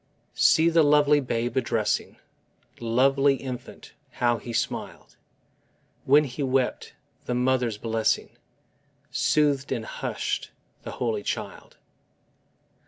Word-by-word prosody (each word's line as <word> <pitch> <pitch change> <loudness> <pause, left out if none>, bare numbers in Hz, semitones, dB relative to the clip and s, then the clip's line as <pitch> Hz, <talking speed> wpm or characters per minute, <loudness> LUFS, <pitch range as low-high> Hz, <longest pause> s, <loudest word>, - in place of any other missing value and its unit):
See 160 +1 +4
the 165 0 +4
lovely 150 0 +4
babe 120 -2 -2
a - - +4
dressing; 115 -3 -1 0.6
Lovely 135 +4 +3
infant, 130 -2 -8 0.2
how 120 -1 +1
He 120 - -8
smiled! 115 - -4 0.9
When 145 +3 +5
He 140 0 -6
wept, 130 -2 -1 0.3
the 125 - -2
mother's 125 -3 +1
blessing 110 0 -1 0.8
Soothed 145 -2 +1
and 120 -4 -2
hush'd - - -4 0.3
the - - -8
holy 115 -4 -2
child. - - -6
130 Hz, 105 wpm, -25 LUFS, 120-140 Hz, 0.9 s, When